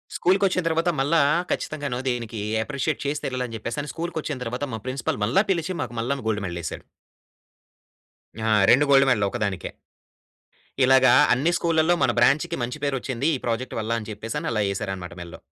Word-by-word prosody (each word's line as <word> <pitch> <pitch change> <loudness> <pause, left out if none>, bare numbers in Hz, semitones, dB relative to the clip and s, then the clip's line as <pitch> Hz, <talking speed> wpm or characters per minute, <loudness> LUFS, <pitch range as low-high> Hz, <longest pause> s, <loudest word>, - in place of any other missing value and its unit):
స్కూల్‌కి 190 +3 +2
వచ్చిన 185 -1 0
తర్వాత 165 +1 +1
మళ్ళా 150 +4 +3 0.3
ఖచ్చితంగాను 145 -5 -3
దీనికి 115 -3 -3 0.2
అప్రిషియేట్ 140 +3 -2
చేసి 145 +1 -2
తీరాలి 130 -1 -2
అని 115 - -8
చెప్పేసని, 140 +7 -4
స్కూల్‌కి 170 0 -4
వచ్చిన 150 -2 -4
తర్వాత 125 +5 -3
మా 110 - -4
ప్రిన్సిపల్ 130 -4 -2
మళ్ళా 130 - +3
పిలిచి 175 0 -1
మాకు 120 -4 -5
మళ్లాను 135 +3 -2
గోల్డ్ 105 -2 -1
మెడల్ 85 -1 -4
ఎసారు. - - -5 1.6
ఆ! - - 0 0.2
2 140 +4 +5
గోల్డ్ 135 0 +6
మెడల్ 105 -6 +2
ఒకదానికే. 100 -5 -3 1.1
ఇలాగా 130 0 +6 0.2
అన్ని 145 +7 +1
స్కూల్‌లల్లో 165 0 +2
మన 125 -2 +3
బ్రాంచ్‌కి 140 +4 +3
మంచి 120 +1 -5
పేరు 140 -1 0
వచ్చింది 130 +4 -1
ఈ - - -13
ప్రాజెక్ట్ 120 +2 -2
వల్ల. 110 +1 -4
అని 110 - -9
చెప్పేసి 110 +2 -5
అలా 110 -2 +1
యేసారనమాట 95 -2 -4
మెళ్ళో. 85 -1 -9
130 Hz, 170 wpm, -24 LUFS, 115-150 Hz, 1.6 s, గోల్డ్